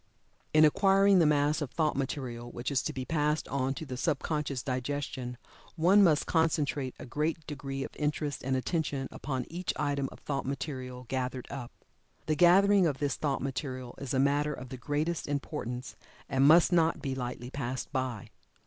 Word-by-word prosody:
In 155 Hz, 0 st, +7 dB
acquiring 195 Hz, +4 st, +5 dB
the 165 Hz, -, +5 dB
mass 150 Hz, +1 st, +2 dB
of 145 Hz, -, -2 dB
thought 155 Hz, +1 st, 0 dB
material 130 Hz, -3 st, -3 dB
which 120 Hz, +4 st, -4 dB
is 135 Hz, -, +2 dB
to -, -, -3 dB
be 130 Hz, -1 st, -5 dB
passed 150 Hz, 0 st, 0 dB
on 135 Hz, 0 st, 0 dB
to 160 Hz, -, -6 dB
the 130 Hz, -3 st, -6 dB
sub 150 Hz, +2 st, +1 dB
conscious 145 Hz, -4 st, -2 dB
digestion, 130 Hz, -1 st, -3 dB, 0.4 s
one 185 Hz, +5 st, +5 dB
must 155 Hz, -5 st, +4 dB
concentrate 150 Hz, -5 st, +1 dB
a -, -, -8 dB
great 155 Hz, +4 st, -2 dB
degree 135 Hz, -2 st, -4 dB
of -, -, -8 dB
interest 150 Hz, -1 st, -2 dB
and 130 Hz, +1 st, 0 dB
attention 140 Hz, -1 st, -1 dB
upon 130 Hz, -3 st, -3 dB
each 175 Hz, +2 st, -3 dB
item 140 Hz, -2 st, -1 dB
of -, -, -11 dB
thought 140 Hz, -2 st, -3 dB
material 130 Hz, -3 st, -5 dB
gathered 130 Hz, 0 st, -2 dB
up. 130 Hz, -4 st, -6 dB, 0.5 s
The 155 Hz, -, +1 dB
gathering 185 Hz, +3 st, +6 dB
of 145 Hz, -4 st, -1 dB
this 140 Hz, -1 st, -1 dB
thought 140 Hz, -4 st, -1 dB
material 130 Hz, -2 st, -4 dB
is 135 Hz, -2 st, -5 dB
a 130 Hz, -, +1 dB
matter 145 Hz, +2 st, +2 dB
of 125 Hz, 0 st, -9 dB
the 130 Hz, -, -6 dB
greatest 150 Hz, +6 st, -2 dB
importance, 135 Hz, -3 st, -4 dB, 0.3 s
and 135 Hz, +1 st, +3 dB
must 165 Hz, +4 st, +7 dB
not 165 Hz, -2 st, +3 dB
be 135 Hz, -2 st, -3 dB
lightly 125 Hz, -1 st, -5 dB
passed 130 Hz, -2 st, -4 dB
by. 130 Hz, -5 st, -3 dB
140 Hz, 180 wpm, -30 LUFS, 130-155 Hz, 0.5 s, In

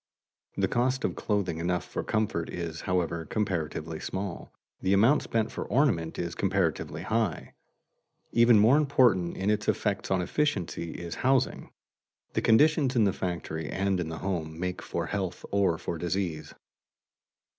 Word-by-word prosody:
The -, -, +2 dB
cost 130 Hz, +2 st, 0 dB
of -, -, -1 dB
clothing 95 Hz, -6 st, -1 dB
enough 90 Hz, +1 st, -1 dB
for -, -, -4 dB
comfort 105 Hz, -7 st, -1 dB
is, 85 Hz, -2 st, -5 dB
however, 85 Hz, -3 st, -1 dB
comparatively 80 Hz, -4 st, -2 dB
small, 95 Hz, -1 st, -5 dB, 0.3 s
the 95 Hz, -, +2 dB
amount 115 Hz, +9 st, +5 dB
spent 110 Hz, -1 st, -1 dB
for -, -, -4 dB
ornament 105 Hz, -, +1 dB
is 85 Hz, -1 st, -3 dB
comparatively 95 Hz, -5 st, -1 dB
high. 110 Hz, -5 st, -1 dB, 0.8 s
Even 120 Hz, -1 st, +6 dB
more 110 Hz, +7 st, +6 dB
important 125 Hz, -, +3 dB
in 100 Hz, +2 st, +1 dB
its 105 Hz, -1 st, -1 dB
effects 100 Hz, -2 st, 0 dB
on 95 Hz, -, +2 dB
efficiency 90 Hz, -, -1 dB
is 85 Hz, -1 st, -6 dB
housing. 130 Hz, -1 st, +1 dB, 0.6 s
The -, -, 0 dB
conditions 140 Hz, +2 st, +4 dB
in 115 Hz, -, +4 dB
the 100 Hz, -2 st, +2 dB
factory 80 Hz, -4 st, -4 dB
and 95 Hz, -1 st, 0 dB
in 85 Hz, -2 st, -2 dB
the 80 Hz, -, -5 dB
home 80 Hz, -4 st, -3 dB
make 90 Hz, 0 st, -3 dB
for -, -, -3 dB
health 95 Hz, -3 st, -3 dB
or 95 Hz, -4 st, +2 dB
for 85 Hz, +1 st, -4 dB
disease. 85 Hz, -3 st, -3 dB
95 Hz, 150 wpm, -28 LUFS, 85-110 Hz, 0.8 s, Even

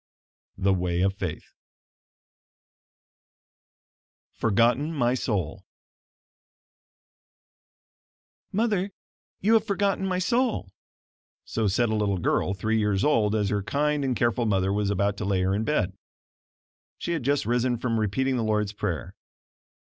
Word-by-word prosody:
The 95 Hz, +1 st, +2 dB
Way 90 Hz, -1 st, 0 dB
of 95 Hz, +1 st, +2 dB
Faith 100 Hz, -, -6 dB, 2.8 s
"FORGOTTEN 120 Hz, +7 st, +2 dB
MY 120 Hz, -3 st, +2 dB
SOUL" 105 Hz, -, -2 dB, 2.9 s
"Mother, 205 Hz, -2 st, 0 dB, 0.5 s
you 215 Hz, +4 st, +3 dB
have 225 Hz, -2 st, +5 dB
forgotten 200 Hz, -1 st, 0 dB
my 185 Hz, -1 st, 0 dB
soul," 220 Hz, -, 0 dB, 0.7 s
so 110 Hz, -2 st, -1 dB
said 115 Hz, +4 st, +2 dB
a 110 Hz, -, 0 dB
little 100 Hz, -2 st, +1 dB
girl, 90 Hz, +2 st, 0 dB
three 110 Hz, +3 st, 0 dB
years 105 Hz, -2 st, +1 dB
old 110 Hz, -8 st, +3 dB
as 105 Hz, -2 st, +1 dB
her 105 Hz, -1 st, 0 dB
kind 150 Hz, +6 st, 0 dB
and 130 Hz, -2 st, 0 dB
careful 120 Hz, 0 st, +1 dB
mother 95 Hz, -1 st, +1 dB
was 105 Hz, -1 st, 0 dB
about 100 Hz, 0 st, 0 dB
to 105 Hz, -, -3 dB
lay 95 Hz, -2 st, +1 dB
her 95 Hz, +1 st, +1 dB
in 105 Hz, +3 st, 0 dB
bed. 105 Hz, -9 st, 0 dB, 1.0 s
She -, -, -4 dB
had 165 Hz, -3 st, -1 dB
just 140 Hz, +1 st, +1 dB
risen 120 Hz, +2 st, +1 dB
from 115 Hz, -1 st, -1 dB
repeating 130 Hz, +6 st, 0 dB
the 115 Hz, -, 0 dB
Lord's 105 Hz, -2 st, 0 dB
prayer. -, -, -3 dB
110 Hz, 130 wpm, -26 LUFS, 100-145 Hz, 2.9 s, have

